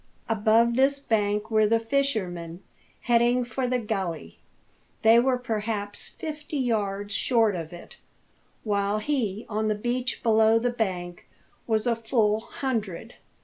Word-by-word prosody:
Above 225 +2 +3
this 275 +2 +3
bank 210 -4 0
were 215 -1 +4
the 230 +1 +3
fishermen, 195 -9 -2 0.4
heading 240 +1 +3
for 255 +1 -2
the 250 0 +1
gully. 190 - -4 0.6
They 225 +1 +7
were 255 +1 +2
perhaps 215 -3 -4
fifty 300 -1 -6
yards 205 -5 -1
short 225 -4 +2
of 165 -1 -5
it, 175 0 -12 0.7
while 205 -1 0
he, 220 -4 -2
on 215 0 -1
the 215 - +1
beach 245 +4 -2
below 220 -1 +4
the 240 +2 0
bank, 180 -6 -3 0.4
was 220 -1 +1
a 240 -1 +2
full 225 -2 +1
hundred. 220 -7 -4
220 Hz, 135 wpm, -26 LUFS, 205-245 Hz, 0.7 s, They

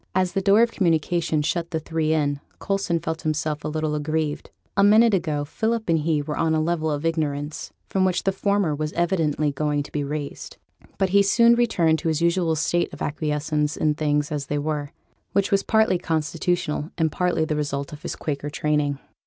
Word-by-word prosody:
As 185 -1 +2
the 195 - 0
door 200 +4 +5
of 235 - +1
communication 165 -3 +1
shut 170 +2 -1
the 160 -2 -2
three 160 0 -1
in, 145 -2 +1 0.2
Coulson 195 -4 -1
felt 160 0 -4
himself 155 -1 -2
a - - -2
little 155 0 -2
aggrieved. 150 0 -2 0.3
A 200 - +4
minute 215 +2 +6
ago 150 -6 0
Philip 225 +7 -2
and 165 -1 +3
he 150 -1 0
were 150 0 -4
on 160 -1 +2
a - - +2
level 160 0 0
of 150 +1 -2
ignorance, 150 -2 -2 0.2
from 190 - 0
which 185 -1 +1
the 195 - +2
former 200 -4 +1
was 150 +1 -3
evidently 160 -4 +1
going 145 0 -1
to - - -13
be 150 - -2
raised. 145 0 -5 0.4
But 190 -1 +1
he 200 +2 +5
soon 235 +4 +5
returned 180 -10 +2
to 170 - -3
his 160 -2 +1
usual 170 -1 +2
state 175 +3 0
of - - -6
acquiescence 150 0 -1
in 155 -1 +2
things 150 0 0
as 145 -2 -3
they 145 - -1
were, 145 -1 -2 0.4
which 200 0 +1
was 200 0 +4
partly 220 -5 +2
constitutional, 160 -1 -1
and 160 -2 +1
partly 180 -3 0
the 155 - -1
result 140 -1 -3
of 150 - -10
his - - -4
Quaker 145 -1 -4
training. 150 -1 0
160 Hz, 200 wpm, -24 LUFS, 150-180 Hz, 0.4 s, minute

